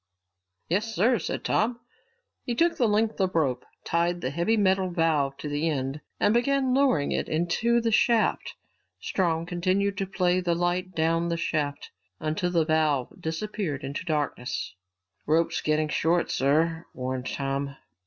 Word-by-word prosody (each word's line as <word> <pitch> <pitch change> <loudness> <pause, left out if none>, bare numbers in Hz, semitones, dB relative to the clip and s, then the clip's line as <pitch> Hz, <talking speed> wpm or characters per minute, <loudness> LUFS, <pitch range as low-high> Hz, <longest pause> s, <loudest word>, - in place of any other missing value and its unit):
"Yes, 215 +6 -1
sir," 230 +5 +3
said - - -4
Tom. 235 +2 +1 0.6
He 240 - -2
took 335 +6 +3
the 240 - +2
length 215 +1 +1
of 190 -2 0
rope, 130 -6 +1 0.2
tied 170 +1 0
the 130 - -2
heavy 170 +9 +1
metal 190 -2 +2
valve 155 -5 +1
to - - -6
the 145 +3 0
end, 135 0 -2 0.2
and 205 - +3
began 265 +2 +2
lowering 260 - +2
it - - -1
into 175 +9 +1
the 230 -1 0
shaft. 230 +1 +2 0.4
Strong 165 -3 0
continued 185 +3 0
to 195 - -1
play 180 -1 +1
the 175 -2 0
light 175 +1 -1
down 165 +1 +1
the 170 - -1
shaft 150 -3 -2 0.3
until 155 +3 -1
the 170 -3 +2
valve 155 -5 +1
disappeared 160 -3 -3
into 140 +2 -4
the - - -23
darkness. 145 -9 -2 0.5
"Rope's 160 +2 +2
getting 155 0 +1
short, 165 +3 +1
sir," 160 +4 +1
warned 130 0 -3
Tom. 140 0 -3
170 Hz, 155 wpm, -26 LUFS, 150-195 Hz, 0.6 s, sir